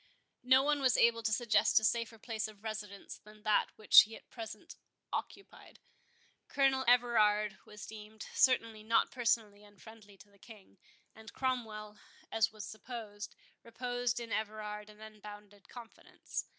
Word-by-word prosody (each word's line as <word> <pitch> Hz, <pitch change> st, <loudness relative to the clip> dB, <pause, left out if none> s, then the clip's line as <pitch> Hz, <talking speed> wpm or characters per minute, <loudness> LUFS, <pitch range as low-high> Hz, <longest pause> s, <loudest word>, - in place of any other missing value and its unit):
No 260 Hz, +2 st, +5 dB
one 295 Hz, 0 st, +1 dB
was 260 Hz, -3 st, +3 dB
able 230 Hz, 0 st, +4 dB
to 220 Hz, -1 st, -1 dB
suggest 225 Hz, -1 st, +3 dB
a -, -, -11 dB
safer 230 Hz, 0 st, 0 dB
place 220 Hz, -1 st, -4 dB
of 215 Hz, -1 st, -15 dB
residence 210 Hz, -2 st, -7 dB
than 210 Hz, 0 st, -17 dB
that 215 Hz, -1 st, +3 dB
which 215 Hz, -, +9 dB
he 220 Hz, +1 st, -5 dB
at -, -, -16 dB
present 225 Hz, -2 st, -9 dB, 0.4 s
occupied. 395 Hz, 0 st, -7 dB, 0.7 s
Colonel 270 Hz, -1 st, +2 dB
Everard 215 Hz, -4 st, +3 dB
was 210 Hz, -1 st, -10 dB
deemed 215 Hz, 0 st, -10 dB
certainly 230 Hz, -4 st, +2 dB
not 225 Hz, +1 st, +2 dB
personally 220 Hz, -4 st, 0 dB
unfriendly 205 Hz, 0 st, -16 dB
to 205 Hz, -, -18 dB
the 200 Hz, -, -25 dB
King; 205 Hz, -3 st, -16 dB, 0.3 s
and 220 Hz, 0 st, -12 dB
Cromwell, 215 Hz, -5 st, -3 dB, 0.3 s
as 225 Hz, 0 st, +2 dB
was 215 Hz, -2 st, -8 dB
supposed, 215 Hz, -2 st, -8 dB, 0.3 s
reposed 245 Hz, +1 st, -2 dB
in 235 Hz, -1 st, -7 dB
Everard 210 Hz, -1 st, -4 dB
an 210 Hz, 0 st, -16 dB
unbounded 205 Hz, -2 st, -12 dB
confidence. 235 Hz, -2 st, -8 dB
220 Hz, 145 wpm, -33 LUFS, 210-235 Hz, 0.7 s, which